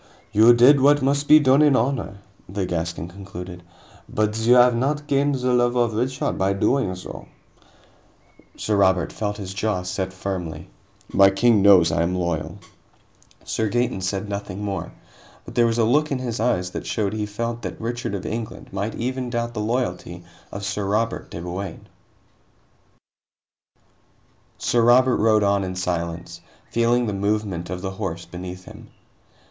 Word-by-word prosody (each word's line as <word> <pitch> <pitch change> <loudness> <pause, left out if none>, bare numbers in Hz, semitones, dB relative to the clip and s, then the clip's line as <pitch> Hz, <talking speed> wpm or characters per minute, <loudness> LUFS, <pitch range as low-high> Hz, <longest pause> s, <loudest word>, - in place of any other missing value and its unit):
"You 110 +3 +6
did 130 +4 +6
what 145 +1 +4
must 140 +1 +1
be 155 - +9
done 135 0 +4
in 145 -3 +5
honor," 115 -5 -1 0.3
the 95 0 -2
Gascon 85 -2 -3
conceded, 90 -1 -9 0.5
"but 105 0 0
you 120 +2 +4
have 125 -1 +6
not 145 +5 -1
gained 140 -1 +1
the 125 -1 0
love 120 0 +2
of 120 -2 +1
Richard 130 +4 -2
by 95 +1 +2
doing 100 -1 +1
so." 90 - -9 1.3
Sir 105 -1 -1
Robert 95 -3 +2
felt 105 -1 -3
his 95 -3 -6
jaw 100 -2 -1
set 95 +1 -3
firmly. 90 -6 -5 0.4
"My 95 0 +7
king 105 +2 +3
knows 95 -4 +6
I 85 - +1
am 85 +2 0
loyal." 85 -3 -2 0.9
Sir 110 -1 -1
Gaeton 120 -4 -1
said 95 +2 -2
nothing 100 -1 -5
more, 100 -1 -4 0.5
but - - -10
there 120 -1 +3
was 115 0 0
a 115 - +3
look 150 +7 +2
in 135 - 0
his 120 -2 -4
eyes 90 -6 0
that - - -6
showed 105 -3 -1
that - - -3
he 105 -1 -2
felt 115 +3 -4
that - - -6
Richard 120 -1 -3
of 95 - -6
England 115 -3 -6
might 100 +3 -3
even 125 +1 -3
doubt 120 0 -2
the 110 - -4
loyalty 110 -5 -3 0.3
of 100 0 -6
Sir 100 +1 -2
Robert 110 +3 -1
de - - -7
Bouain. 90 +3 -6 2.7
Sir 120 - +1
Robert 125 +2 +5
rode 110 -1 +3
on 100 0 +2
in 95 0 -4
silence, 85 -2 -4 0.3
feeling 120 +1 +2
the 105 - -2
movement 100 -3 -2
of 90 +1 -5
the 95 - -3
horse 95 -4 -5
beneath 90 +1 -8
him. - - -12
105 Hz, 165 wpm, -23 LUFS, 95-120 Hz, 2.7 s, be